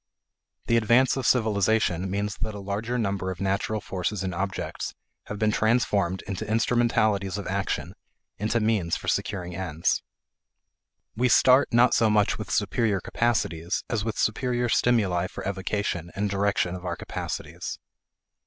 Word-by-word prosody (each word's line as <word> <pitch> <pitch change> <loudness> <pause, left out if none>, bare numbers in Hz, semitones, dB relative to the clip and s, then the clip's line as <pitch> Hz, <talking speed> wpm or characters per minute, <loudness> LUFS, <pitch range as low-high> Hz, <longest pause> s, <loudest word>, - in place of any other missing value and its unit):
The 115 - +3
advance 120 +3 +4
of 135 -2 -1
civilization 105 -5 +2
means 100 +1 -2
that 110 -1 -4
a - - -6
larger 105 +5 -3
number 100 -4 -1
of 90 -2 -5
natural 100 +3 -1
forces 95 0 -3
and 95 -1 -2
objects 95 +2 -4 0.3
have 105 - -6
been 110 +1 +2
transformed 105 -5 +1
into 100 +2 -4
instrumentalities 110 -4 +1
of 100 - -5
action, 100 +1 -2 0.5
into 110 +3 +1
means 105 -6 +1
for - - -10
securing 90 -3 -2
ends. 85 -3 0 1.1
We 125 +3 +2
start 130 +3 +5
not 120 +1 +5
so 115 - +4
much 105 0 +2
with 105 -2 -6
superior 105 0 +1
capacities 95 -6 -1
as 110 -4 0
with 110 -1 -3
superior 120 +2 0
stimuli 100 -8 +2
for 95 - -7
evocation 95 -3 -2
and 100 0 -1
direction 100 -3 +1
of 90 -1 -7
our 85 -2 -2
capacities. - - -5
105 Hz, 145 wpm, -26 LUFS, 95-115 Hz, 1.1 s, start